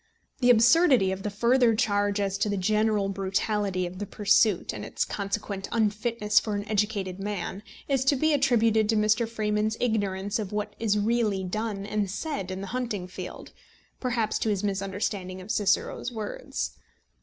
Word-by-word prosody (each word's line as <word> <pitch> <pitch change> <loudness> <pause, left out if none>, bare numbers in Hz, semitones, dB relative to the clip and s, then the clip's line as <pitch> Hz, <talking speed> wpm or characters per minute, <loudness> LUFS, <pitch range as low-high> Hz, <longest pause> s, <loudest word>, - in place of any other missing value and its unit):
The 245 - +3
absurdity 245 - +5
of 190 0 -4
the 210 - -2
further 235 +3 +3
charge 205 -1 +1
as 195 -1 0
to 210 - +1
the 200 - -1
general 210 +1 +1
brutality 195 0 -1
of 180 +1 -7
the 205 - -4
pursuit, 205 -1 +2
and - - -6
its - - -2
consequent 200 -1 -4
unfitness 215 0 +2
for 210 -2 -3
an 205 0 -4
educated 205 -3 -1
man, 200 0 -4 0.3
is 270 -2 +1
to 280 - +4
be 310 +3 +2
attributed 230 -6 +3
to 225 - +3
Mr. 215 +2 +2
Freeman's 215 -1 -1
ignorance 205 -2 -1
of 205 -3 -4
what 210 0 -3
is 215 -2 +1
really 210 -2 +1
done 205 +1 -3
and 210 -1 -1
said 215 - -4
in 185 +1 -4
the - - -4
hunting 230 -7 -2
field, 185 - -8 0.5
perhaps 235 -4 0
to 220 - 0
his 205 -1 -1
misunderstanding 195 -1 -2
of 185 +3 -6
Cicero's 205 +4 0
words. 235 - -5
210 Hz, 165 wpm, -27 LUFS, 195-225 Hz, 0.5 s, absurdity